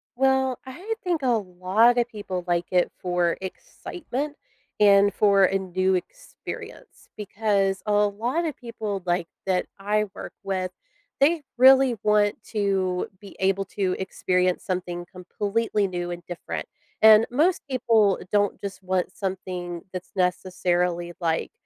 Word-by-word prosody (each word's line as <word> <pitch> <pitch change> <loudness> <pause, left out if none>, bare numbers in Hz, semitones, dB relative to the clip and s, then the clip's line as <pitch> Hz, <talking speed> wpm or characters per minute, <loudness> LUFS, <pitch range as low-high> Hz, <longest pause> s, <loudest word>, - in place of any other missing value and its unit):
Well, 265 -1 +2
I 360 +12 -5
think 345 -5 0
a 260 - 0
lot 210 +2 +3
of 240 0 +2
people 195 -5 -5
like 175 0 +1
it 180 -1 +2
for 175 -2 0
excitement 285 - -6 0.4
and 200 -1 +6
for 200 -2 +4
a 195 +1 +1
new 185 0 0
experience, - - -8
because 200 -2 0
a 210 - +2
lot 215 +10 +1
of 310 - -3
people, 215 -5 -5
like, 175 -1 0 0.2
that 185 -1 +1
I 210 +2 +1
work - - -8
with, 185 -2 -2 0.5
they 310 +4 +4 0.2
really 260 0 +7
want 210 -1 +3
to 195 -4 0
be 200 -2 -13
able 195 +1 +1
to 190 -1 -1
experience 180 -1 0
something 175 -2 -3
completely 205 +3 -1
new 175 -1 -4
and 175 0 -6
different. 175 -1 -5 0.3
And 220 0 +8
most 320 +8 +2
people 225 -6 +3
don't 205 -1 +1
just 195 -1 -6
want 185 0 -1
something 180 -3 -4
that's 185 0 -7
necessarily 180 -1 0
like 165 -2 -1
195 Hz, 135 wpm, -25 LUFS, 185-225 Hz, 0.5 s, And